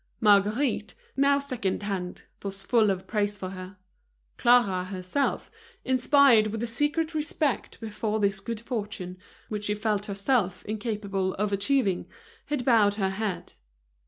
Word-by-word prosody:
Marguerite, 210 0 +2 0.2
now 280 +1 +4
second 250 -9 -2
hand, 185 -3 -4 0.2
was 195 0 -5
full 225 -4 +3
of 190 -1 -2
praise 205 -2 -1
for 185 -1 -5
her. 185 +1 -9 0.6
Clara, 225 -7 +4
herself, 185 +8 -2 0.3
inspired 260 -3 +5
with 220 +2 -4
a - - +1
secret 295 +7 -1
respect 305 -3 -1
before 220 -1 -2
this 200 -1 +2
good 230 +2 -5
fortune, 210 -6 -5 0.3
which 210 -1 -4
she 210 - 0
felt 210 -1 -1
herself 200 -1 0
incapable 205 -3 -2
of 205 0 -1
achieving, 200 -2 +1 0.4
had 290 -5 -2
bowed 215 -5 +4
her 195 -2 0
head. 200 -2 -4
210 Hz, 135 wpm, -27 LUFS, 195-245 Hz, 0.6 s, inspired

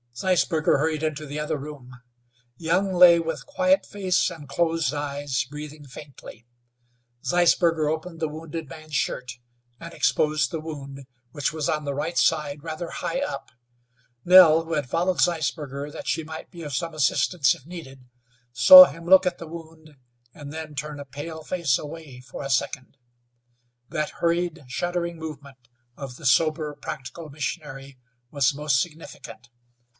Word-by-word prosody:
Zeisberger 165 -1 +2
hurried 155 +1 -1
into 155 -1 -2
the 145 +1 -5
other 150 0 -2
room. 140 -3 -10 0.7
Young 180 +4 0
lay 175 -1 +7
with 165 0 -4
quiet 285 0 +2
face 190 -3 0
and 145 -4 -11
closed 165 -2 0
eyes, 145 -2 -2
breathing 150 0 -9
faintly. 135 -4 -12 0.8
Zeisberger 170 -2 +2
opened 160 +2 -4
the 160 - 0
wounded 160 +1 -7
man's 155 +2 -9
shirt 125 -2 -2 0.5
and 170 0 -9
exposed 150 -1 +1
the 165 - -3
wound, 140 -3 -8 0.3
which 145 +2 -2
was 155 -2 -2
on 150 -1 -1
the 140 - -2
right 155 +5 -3
side, 150 -2 +1
rather 165 +1 -5
high 270 - -3
up. 285 - -5 0.7
Nell, 170 -3 +8
who 165 - -5
had 145 -5 -2
followed 180 +5 0
Zeisberger 150 -3 -1
that - - -9
she 160 - -1
might 160 +1 -9
be 170 - -10
of 145 -2 -6
some 165 +4 -2
assistance 140 +1 +2
if 130 - -18
needed, 150 -7 -10 0.5
saw 275 - +11
him 165 -8 -9
look 190 +1 +6
at 180 -1 -1
the 165 - -9
wound 160 -2 -12 0.4
and 145 -1 -10
then 155 -1 -7
turn 150 +1 -5
a 140 - -7
pale 155 +4 -8
face 165 -6 0
away 150 -4 -9
for 130 +2 -9
a 135 - -5
second. 135 +1 -2 0.9
That 150 0 -2
hurried, 170 -1 0
shuddering 170 +5 -3
movement 145 -4 -9 0.4
of 135 -3 -8
the 160 - -12
sober, 155 +2 +2
practical 150 +2 -8
missionary 140 -2 -6 0.3
was 140 0 +1
most 140 -3 +1
significant. 155 -7 -9
155 Hz, 155 wpm, -24 LUFS, 140-165 Hz, 0.9 s, saw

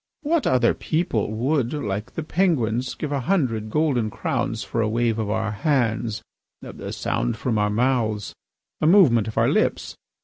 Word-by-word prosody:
What 315 +1 +1
other 125 -2 +3
people 155 - -1
would, 125 +3 0
like 105 -8 -4
the 165 - -3
Penguins, 130 - 0
give 150 - -4
a 140 - 0
hundred 125 - 0
golden 130 -5 +1
crowns - - -2
for 115 - -2
a 110 - +1
wave 115 0 0
of 110 -2 -2
our 110 0 -1
hands, 115 -2 0 0.4
a - - -7
sound - - -2
from 115 -4 -1
our 105 0 +2
mouths, 110 -2 0 0.5
a 155 - +3
movement 150 - +5
of 110 - -6
our - - +4
lips? - - 0
120 Hz, 165 wpm, -23 LUFS, 110-150 Hz, 0.5 s, movement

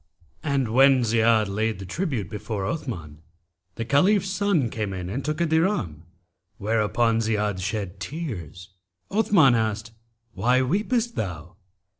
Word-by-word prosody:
[FN#275] 150 - -2
And 135 -3 +1
when 135 0 +6
Ziyad 115 -1 +3
laid 110 +3 -1
the 95 - -8
tribute 125 - -2
before 105 0 -4
Othman, 85 - -5 0.5
the 115 - -4
Caliph's 190 - +3
son 185 - +1
came 105 -3 -3
in 90 -1 -5
and 135 +6 -3
took 150 +1 -2
a 170 - +2
dirham, 160 - 0 0.5
whereupon 115 +2 +1
Ziyad 105 -3 0
shed 95 -1 -4
tears. 100 - -6 0.4
Othman 195 - +4
asked 110 -1 -1 0.4
'Why 125 +2 +2
weepest 220 - 0
thou?' 90 -2 -5
115 Hz, 135 wpm, -24 LUFS, 100-150 Hz, 0.5 s, when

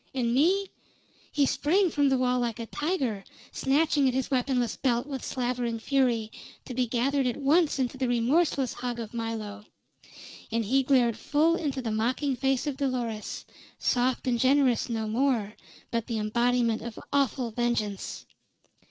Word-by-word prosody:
And 235 -2 0
me 370 +9 +2 0.3
" - - -32
He 285 - +3
sprang 350 +7 +2
from 285 -1 +2
the 265 - +2
wall 250 0 +1
like 235 -3 -1
a 230 - -5
tiger, 265 - -2 0.3
snatching 285 0 +2
at 255 - 0
his 265 +2 -1
weaponless 250 -3 +1
belt 245 -1 0
with 275 -2 -5
slavering 245 -2 -2
fury, 235 -3 +1 0.3
to 255 - -6
be 250 0 0
gathered 260 +3 +1
at 245 - -1
once 295 +3 +3
into 260 0 -2
the 260 - +1
remorseless 260 +3 +1
hug 245 -1 -4
of 225 -1 -6
Milo. 220 -3 -4 0.9
And 230 0 0
he 265 +6 +3
glared 250 -4 +3
full 310 +7 +2
into 280 -6 -2
the 225 - -2
mocking 255 +6 0
face 270 +1 0
of 285 -3 -3
Dolores 245 -6 -3 0.3
soft 250 +2 0
and 245 -2 +1
generous 260 -2 +3
no 220 -2 -2
more, 225 -3 0 0.4
but 230 -2 -1
the 230 -3 -2
embodiment 235 +1 +1
of 235 -2 -7 0.2
awful 265 -4 +1
vengeance. 220 -4 -2
250 Hz, 160 wpm, -27 LUFS, 230-275 Hz, 0.9 s, He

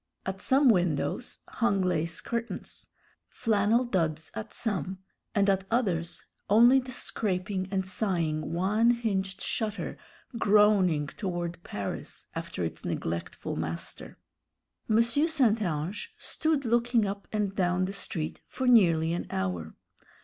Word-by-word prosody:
At 190 0 -4
some 270 +1 +4
windows 180 - +1
hung 200 -5 +1
lace 170 -2 0
curtains, 235 0 -4 0.4
flannel 225 +1 +2
duds 160 -8 -1
at 110 - -6
some, 190 -4 -2 0.4
and 200 -1 +3
at 195 -1 +2
others 185 -8 0 0.2
only 240 +6 +7
the 255 0 -7
scraping 190 -4 -2
and 190 -1 -1
sighing 170 -6 -1
one 205 +7 +2
hinged 195 -5 0
shutter 220 -2 -3 0.4
groaning 200 -8 +4
toward 175 +1 -4
Paris 100 -1 -6
after - - -4
its - - -4
neglectful 85 +1 -3
master. 80 +1 -5 0.7
M. 225 +1 +5
St. 255 -3 +2
Ange 185 - -3
stood 315 -8 0
looking 235 -1 +3
up 200 0 -4
and 205 -2 -1
down 180 0 +2
the 195 - -4
street 160 -5 -4
for 260 - -4
nearly 170 -9 +5
an 175 - -3
hour. 90 -4 -3
195 Hz, 125 wpm, -29 LUFS, 170-230 Hz, 0.7 s, only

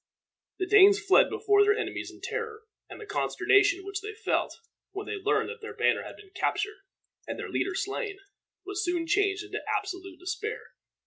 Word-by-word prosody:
The 370 - -1
Danes 405 0 +7
fled 405 -2 +5
before 410 -1 +3
their 415 +1 +3
enemies 445 - -3
in - - -15
terror, 445 -1 -4 0.3
and - - -9
the 430 - -8
consternation 400 -2 +2
which 395 0 -4
they 425 +1 -7
felt, 450 - -1 0.4
when 400 +1 -5
they 425 - -4
learned 420 +1 +1
that 465 0 -8
their 435 - -8
banner - - +2
had - - -9
been 395 -2 -16
captured 420 +1 -1 0.5
and - - -4
their - - -5
leader 385 0 -1
slain, 405 +1 -3 0.5
was 400 +2 -2
soon 350 -1 0
changed 400 +3 +1
into - - -5 0.2
absolute 380 -3 -6
despair. 360 +5 -5
405 Hz, 180 wpm, -28 LUFS, 390-425 Hz, 0.5 s, Danes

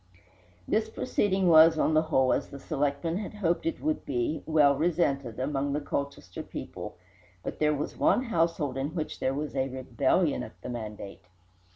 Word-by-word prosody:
This 220 0 +1
proceeding 195 -5 0
was, 160 -1 +7
on 155 - +2
the 155 - +5
whole, 130 -5 +2
as - - -2
the 140 - -9
selectmen 145 +4 -1
had 210 0 -5
hoped 175 - 0
that 330 - 0
it - - -20
would 310 0 0
be, 125 +4 -1
"well 150 -3 +5
resented" 140 -7 0
among 140 +1 -1
the 145 - 0
Colchester 140 -10 -4
people, - - -7 0.5
but - - -5
there 150 0 +3
was 145 - -4
one 255 - +3
household 165 - 0
in 145 +5 -3
which 155 -3 -4
there 130 +1 0
was 150 +1 -3
rebellion 135 +3 0
at - - -9
the - - -5
mandate. 105 -5 -7
150 Hz, 175 wpm, -28 LUFS, 135-165 Hz, 0.5 s, was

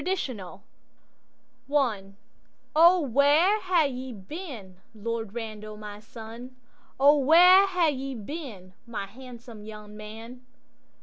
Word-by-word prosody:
Lord 380 +4 0 1.5
Randal 215 -9 0 0.6
I'O 340 +3 +6
WHERE 295 - +3
hae 360 -4 +2
ye 260 -1 -6
been, 215 - -9 0.2
Lord 225 0 -4
Randal, 215 -2 -6
my 210 -1 -9
sonO 250 +5 -2
where 360 +6 +7
hae 360 -4 +2
ye 270 -1 -5
been, 215 - -8
my 220 -4 -4
handsome 235 0 -12
young 210 -1 -10
man? 225 +4 -10
245 Hz, 105 wpm, -27 LUFS, 215-295 Hz, 1.5 s, where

